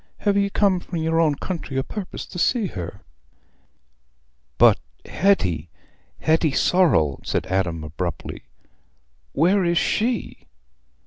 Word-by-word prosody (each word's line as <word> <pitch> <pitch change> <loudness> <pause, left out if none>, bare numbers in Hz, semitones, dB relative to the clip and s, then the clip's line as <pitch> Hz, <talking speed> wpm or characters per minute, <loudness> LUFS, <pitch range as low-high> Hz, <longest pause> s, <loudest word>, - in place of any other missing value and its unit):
"Have 205 -1 +1
ye 200 0 +2
come 195 -2 +2
from 175 0 -6
your 160 0 +1
own 155 -3 +2
country 155 -4 -5
o' 135 - +1
purpose 200 +3 -6
to 180 - -8
see 235 +3 +2
her?" 90 - -6 1.6
"But - - +6 0.3
Hetty—Hetty 155 - -1
Sorrel," 125 - +3
said - - -1
Adam, 90 -4 -1
abruptly; 85 +3 -5 0.9
"Where 185 +6 +3
is 170 0 +1
_she? 235 +7 -1
165 Hz, 115 wpm, -23 LUFS, -, 1.6 s, But